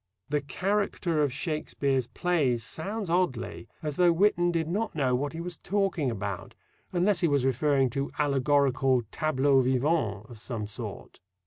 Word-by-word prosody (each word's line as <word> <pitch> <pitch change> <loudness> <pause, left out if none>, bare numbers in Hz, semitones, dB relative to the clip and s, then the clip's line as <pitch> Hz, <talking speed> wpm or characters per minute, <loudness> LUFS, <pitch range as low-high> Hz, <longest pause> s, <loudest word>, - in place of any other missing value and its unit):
"The 150 0 +1
character 180 +1 0
of 145 -3 +2
Shakespeare's 140 -3 -1
plays" 140 -11 0
sounds 200 - -4
oddly, 170 -8 -1 0.2
as 150 -2 -3
though 175 -1 +5
Whitton 175 0 +3
did 165 -2 -1
not 205 +3 -2
know 135 -4 +1
what 140 +4 -1
he 165 - -6
was 175 0 -5
talking 195 -7 0
about, 100 -4 -5 0.4
unless 185 +2 +2
he 170 - +3
was 140 -4 +2
referring 135 0 +2
to 140 +3 -2
allegorical 135 -3 +2
"tableaux 140 -3 +3
vivants" 125 -5 0
of 120 -3 -11
some 110 -2 -4
sort. 105 0 -8
145 Hz, 150 wpm, -28 LUFS, 130-175 Hz, 0.4 s, though